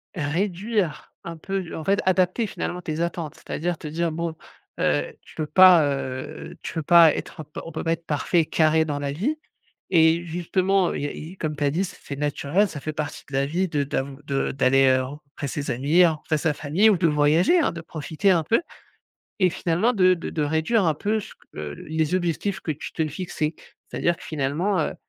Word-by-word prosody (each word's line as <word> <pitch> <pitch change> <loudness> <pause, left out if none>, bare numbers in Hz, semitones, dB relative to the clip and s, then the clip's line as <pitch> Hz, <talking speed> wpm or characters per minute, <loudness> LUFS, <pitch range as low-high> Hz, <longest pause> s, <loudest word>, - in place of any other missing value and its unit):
réduire 180 +4 -2
un 170 -1 -7
peu 195 +4 -3
du 170 - -8
en 160 - -5
fait 195 +5 +2
adapter 185 +4 +2
finalement 180 -2 -4
tes 160 -1 -3
attentes. 170 -2 -3
C'est - - -20
à - - -2
dire, 175 +1 -1
te 155 - -8
dire 165 +2 -1
bon, 165 0 -3 0.4
heu, 75 0 +1
tu - - -18
peux 155 - -2
pas, 180 +1 +7
heu 130 -2 -4
tu - - -6
peux 160 - -3
pas 170 0 +7
être - - -6
on - - -7
p 150 +1 -9
on 165 - -7
peut 155 - -4
pas 165 - +1
être 165 0 -7
parfait 155 +3 +1
et - - -2
carré 160 0 +3
dans 145 -2 -3
la 140 -1 -2
vie 210 - -1 0.6
et 165 +1 +5
justement 180 +2 +1
il - - -3
y - - 0
a - - -4
i 165 +5 -9
comme 155 -4 -3
tu 145 - -2
as 140 - +3
dit, 170 +7 0
c'est 185 - -8
c 140 - -6
naturel, 150 +6 +1
ça 150 - -7
fait 155 - -4
partie 150 -1 -5
de - - -9
la 135 +1 +2
vie. 180 +6 -1
De 145 -3 0
d'av 135 0 -3
de 140 -1 -1
d'aller, 135 0 +4
heu, 130 0 +3
rencontrer 140 +1 -8
ses 145 +1 -3
amis, 145 +9 +4
rencontrer 155 -2 0
sa 160 +1 +1
famille 165 +10 +3
ou 205 - +3
de 170 -1 +2
voyager, 155 - +4
hein 305 - +1
de 170 - -7
profiter 165 +3 -1
un 170 -3 +3
peu. 225 - +2 0.8
Et 185 - +5
finalement 180 +9 +1
de 185 -3 +5
de 170 - -6
de 155 - -2
réduire 160 +9 +1
un 160 - +3
peu 215 +8 -1
ce 205 - -9
q - - -28
heu, 75 -1 -5
les 160 +1 -1
objectifs 185 +2 -1
que 160 - -2
tu 150 - -7
te 160 -2 -1
fixais. 155 0 -3 0.3
C'est-à-dire 170 0 0
que - - -13
finalement, 155 +7 -1
heu, 155 - -1
160 Hz, 230 wpm, -24 LUFS, 150-180 Hz, 0.8 s, pas